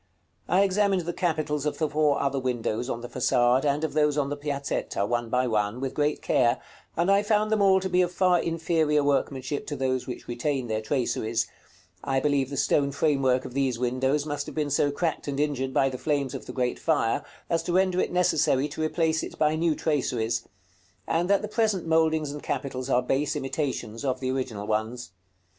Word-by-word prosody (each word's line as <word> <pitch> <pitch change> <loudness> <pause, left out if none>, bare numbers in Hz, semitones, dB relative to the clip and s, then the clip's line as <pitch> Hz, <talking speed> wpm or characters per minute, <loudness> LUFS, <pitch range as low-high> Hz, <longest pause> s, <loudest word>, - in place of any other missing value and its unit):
I 190 +2 +4
examined 200 -1 +2
the 175 +1 -3
capitals 155 -5 -1
of 150 - -2
the 155 - +1
four 150 -1 +2
other 140 -1 0
windows 125 -1 -2
on 120 - -3
the 120 - -6
façade, 125 +1 +2
and 145 +2 +1
of 160 - -1
those 150 -1 +2
on 140 -2 +1
the 145 - -2
Piazzetta, 140 -7 -2
one 120 +1 -1
by 125 +2 +2
one, 105 0 0
with 135 0 -3
great 150 0 0
care, 120 -1 +2 0.4
and 175 +4 +3
I 200 +1 +5
found 215 0 +1
them 215 -1 +2
all 190 -1 +5
to 190 - -3
be 180 0 +3
of 180 -1 +1
far 180 -1 +3
inferior 160 -3 +1
workmanship 140 -1 -1
to 145 - -3
those 130 -2 -1
which 125 - -7
retain 130 +2 -1
their 110 -2 -2
traceries: 115 -2 -1 0.6
I 135 -1 +1
believe 140 -2 +1
the 140 - -5
stone 140 +1 +2
framework 135 -3 +1
of - - -7
these 135 -3 0
windows 130 +4 0
must 145 -1 -3
have - - -8
been 150 -2 -1
so 145 +1 +2
cracked 160 +2 -2
and 140 -1 -2
injured 140 -3 0
by 135 - +3
the 130 -1 -6
flames 140 -4 -1
of - - -7
the - - -5
great 125 -2 -1
fire, 145 -8 +1 0.2
as 165 -1 +1
to 175 - -3
render 185 0 +2
it - - 0
necessary 160 -6 +2
to 160 - -6
replace 160 0 +1
it - - -7
by 155 0 +2
new 160 -1 +1
traceries; 120 -7 -1 0.6
and 175 +3 0
that 200 +1 +3
the - - -2
present 215 -4 0
mouldings 160 -2 +2
and 145 0 -7
capitals 130 -1 -3
are 125 -1 +3
base 135 +3 0
imitations 135 -5 -3
of 130 -2 -1
the 130 -1 -1
original 120 -6 -3
ones. 110 +3 -2
145 Hz, 205 wpm, -26 LUFS, 130-160 Hz, 0.6 s, I